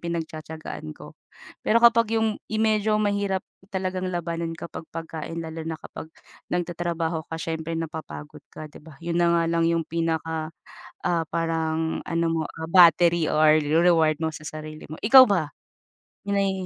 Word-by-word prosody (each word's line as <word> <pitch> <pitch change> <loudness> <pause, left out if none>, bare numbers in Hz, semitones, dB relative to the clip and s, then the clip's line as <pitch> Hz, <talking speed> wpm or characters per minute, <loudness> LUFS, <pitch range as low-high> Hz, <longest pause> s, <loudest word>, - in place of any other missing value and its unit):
pinagtatiyagaan 160 - -6
ko. - - -12 0.5
Pero 220 - +2
kapag 230 -1 +5
yung, 220 -1 0
yung 220 0 +1
medyo 215 -1 +2
mahirap 200 -2 0 0.3
talagang 185 -1 -2
labanan 170 -1 -3
kapag 165 -1 -8
pagkain 165 0 -6
lalo 160 0 -6
na 160 -1 -3
kapag 160 - -9 0.4
nagtatrabaho 170 -2 -2
ka 165 - -4
siyempre 165 0 -4
napapagod 155 - -7
ka 155 - -9
'di - - -14
ba? 155 0 -14
'Yon 170 0 -1
na 175 - +4
nga 170 - +2
lang 165 0 +2
yung 165 -1 +1
pinaka 160 -1 -2 0.6
ah, 170 -3 +1
parang 160 -1 -1
ano 170 0 0
mo, 165 -1 0 0.2
ah, 160 - -4
battery 170 -1 +6
or 155 0 +5
reward 160 0 +3
mo 160 - +1
sa 155 - -9
sarili 155 0 -8
mo. - - -5
Ikaw 260 +4 +9
ba? 180 -9 0 0.8
'Yun 200 - 0
ay 195 -1 +2
165 Hz, 160 wpm, -25 LUFS, 160-180 Hz, 0.8 s, Ikaw